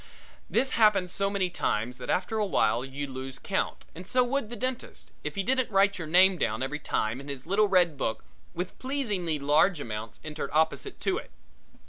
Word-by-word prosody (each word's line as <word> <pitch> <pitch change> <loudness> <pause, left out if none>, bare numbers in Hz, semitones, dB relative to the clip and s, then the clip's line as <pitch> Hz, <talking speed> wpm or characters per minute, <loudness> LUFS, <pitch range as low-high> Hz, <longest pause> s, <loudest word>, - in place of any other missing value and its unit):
This 265 0 +1
happens 205 -5 +4
so 195 +1 0
many 195 -3 0
times 125 0 -1
that 125 - -7
after 195 +4 0
awhile 130 - +2
you 135 +2 -5
lose 130 -1 -6
count - - -2
and 180 +3 -10
so 250 +2 +3
would 245 -2 -1
the 240 - -6
dentist, 255 +1 -5
if - - -4
he 195 - 0
didn't 260 +4 +1
write 200 -1 +3
your 165 - -4
name 185 +2 +5
down 110 +4 0
every 145 +3 -3
time 115 -2 -1
in 140 - -11
his 140 -2 -5
little 200 +4 +3
red 175 -7 +3
book 110 -3 -2 0.3
with 180 +2 -5
pleasingly 210 - -1
large 150 +5 +3
amounts 110 -4 -6
entered 155 0 -5
opposite 160 - +1
to 380 +3 +1
it. - - -12
180 Hz, 190 wpm, -28 LUFS, 140-210 Hz, 0.3 s, name